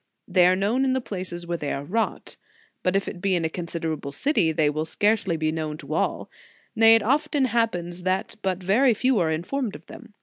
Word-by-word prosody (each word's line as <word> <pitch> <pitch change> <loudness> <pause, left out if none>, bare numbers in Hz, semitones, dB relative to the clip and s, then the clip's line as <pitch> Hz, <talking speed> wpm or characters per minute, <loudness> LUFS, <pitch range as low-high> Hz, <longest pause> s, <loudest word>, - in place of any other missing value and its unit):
They 180 -1 +4
are 185 - +4
known 210 +8 +1
in 265 -1 +2
the 260 - +1
places 185 -6 -5
where 170 -1 -3
they 145 - -3
are 140 - -3
wrought, 225 +9 -2 0.5
but 185 +1 0
if 195 - 0
it 175 - -6
be 195 -1 +1
in 170 -2 0
a - - 0
considerable 165 -4 -4
city, 200 - +1
they 155 -1 +2
will 150 +1 -1
scarcely 200 +1 +1
be 155 0 0
known 155 -1 -4
to 155 -2 -7
all; - - -1 0.5
nay, 225 0 +7
it 225 - +2
often 290 +3 +1
happens 180 -7 -1
that 185 +1 -1
but 185 -1 -2
very 230 +6 +3
few 255 0 +2
are 165 -3 +1
informed 200 - -2
of 150 - -12
them. 230 -4 -13
185 Hz, 215 wpm, -24 LUFS, 165-225 Hz, 0.5 s, nay